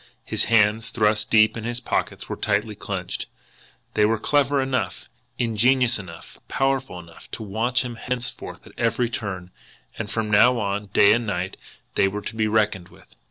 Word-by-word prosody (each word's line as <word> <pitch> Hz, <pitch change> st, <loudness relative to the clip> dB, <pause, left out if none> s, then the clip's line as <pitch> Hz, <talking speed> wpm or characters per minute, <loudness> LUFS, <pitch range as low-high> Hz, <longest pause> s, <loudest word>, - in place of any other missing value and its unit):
His -, -, 0 dB
hands, 110 Hz, -1 st, +3 dB
thrust 105 Hz, -2 st, +1 dB
deep 110 Hz, -1 st, +5 dB
in 115 Hz, -, -5 dB
his 120 Hz, +1 st, -3 dB
pockets, -, -, -2 dB
were -, -, -4 dB
tightly 110 Hz, 0 st, 0 dB
clenched. 95 Hz, -3 st, -5 dB, 0.7 s
They 105 Hz, -, +3 dB
were 110 Hz, +2 st, +3 dB
clever 140 Hz, +4 st, +2 dB
enough, 130 Hz, -9 st, -2 dB, 0.3 s
ingenious 120 Hz, +1 st, +2 dB
enough, 85 Hz, -4 st, -11 dB
powerful 135 Hz, -8 st, -1 dB
enough 85 Hz, -1 st, -14 dB
to 110 Hz, -, -6 dB
watch 115 Hz, +5 st, 0 dB
him 120 Hz, -1 st, -6 dB
henceforth 125 Hz, 0 st, -4 dB
at -, -, -15 dB
every 120 Hz, 0 st, +1 dB
turn 95 Hz, -5 st, -5 dB, 0.5 s
and 110 Hz, -2 st, -3 dB
from 110 Hz, -1 st, -2 dB
now 120 Hz, +4 st, +6 dB
on, 105 Hz, -1 st, -2 dB
day 100 Hz, +1 st, +5 dB
and 120 Hz, -1 st, 0 dB
night, 95 Hz, -1 st, -2 dB, 0.4 s
they 95 Hz, -, +3 dB
were 105 Hz, +2 st, -3 dB
to -, -, -6 dB
be 110 Hz, -1 st, +1 dB
reckoned 105 Hz, -4 st, +1 dB
with. -, -, -20 dB
110 Hz, 170 wpm, -24 LUFS, 100-120 Hz, 0.7 s, now